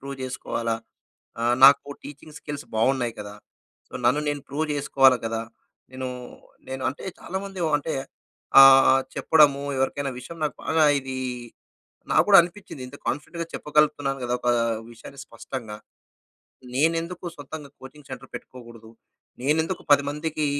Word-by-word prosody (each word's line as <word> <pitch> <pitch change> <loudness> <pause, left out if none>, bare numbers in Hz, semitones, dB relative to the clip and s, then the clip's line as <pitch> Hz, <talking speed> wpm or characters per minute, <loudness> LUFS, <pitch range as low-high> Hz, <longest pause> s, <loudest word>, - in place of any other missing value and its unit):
Prove 140 0 -7
చేసుకోవాలా? 115 -3 -3 0.6
ఆహ్, 120 +1 +2
నాకు 140 +1 +6
టీచింగ్ 150 +2 -11
స్కిల్స్ 145 -1 -7
బాగున్నాయి 120 0 +1
కదా! 105 0 -8 0.5
సో, - - -27
నన్ను 125 +5 +3
నేను 145 -1 -2
ప్రూవ్ 150 +3 -2
చేసుకోవాలి 135 -2 +4
కదా! 115 0 -2 0.5
నేను, 130 0 -5 0.6
నేను 130 0 -5
అంటే 145 - -7 0.2
చాలా 190 - -6
మంది 195 -2 -8 0.2
అంటే 155 +2 -4 0.7
ఆహ్, 135 0 +8
చెప్పడము 145 -3 +4 0.2
ఎవరికైనా 135 +1 -1
విషయం 165 +7 -10
నాకు 150 - -3
బాగా 160 -1 +3 0.2
ఇది 130 0 -6 1.0
నాకు - - +5
కూడా 200 - +9
అనిపించింది 175 -5 -9
ఇంత 140 - -11
కాన్ఫిడెంట్‌గా 165 +5 -3
చెప్పగలుగుతున్నాను 150 -2 +1
కదా! 120 0 -1
ఒక 125 - -2 0.4
విషయాన్ని 135 +4 -12
స్పష్టంగా. 115 -6 -8 1.0
నేనెందుకు 165 +5 0
సొంతంగా 145 +1 -9
కోచింగ్ 140 +2 -13
సెంటర్ 130 0 -9
పెట్టుకోకూడదు. 115 -3 -11 0.5
నేనెందుకు 160 +6 0
10 145 - +5
మందికి 150 +1 -2
140 Hz, 130 wpm, -24 LUFS, 130-150 Hz, 1.0 s, కూడా